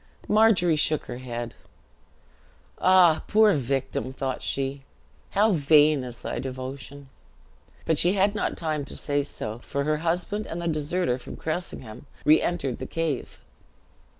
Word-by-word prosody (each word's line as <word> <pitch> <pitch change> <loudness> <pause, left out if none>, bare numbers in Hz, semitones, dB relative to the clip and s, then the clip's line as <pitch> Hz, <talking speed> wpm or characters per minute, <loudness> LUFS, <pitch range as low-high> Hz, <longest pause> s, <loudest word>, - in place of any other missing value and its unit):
Margery 210 -6 +4
shook 150 0 +1
her 120 0 -7
head. 120 -2 -5 1.3
"Ah, 180 -4 +5
poor 215 -1 +5
victim 135 -2 -2
(thought 130 0 -3
she), 135 0 -3 0.5
how 210 +2 +3
vain 150 -3 +4
is 120 -1 -8
thy - - -3
devotion!" 135 +1 -7 0.8
But 160 -2 +2
she 175 +2 +4
had 200 +1 +2
not 215 - -2
time 155 -3 -2
to - - -7
say 145 -1 -1
so, 110 -5 -5
for 140 +3 -3
her 155 +1 +1
husband 175 +6 -2
and 165 - -5
the 170 - -3
deserter 155 -3 0
from - - -9
Cressingham 145 -7 -5 0.2
re 155 +1 +6
entered 140 -8 -2
the - - -5
cave. 165 -5 -3
150 Hz, 145 wpm, -26 LUFS, 135-175 Hz, 1.3 s, re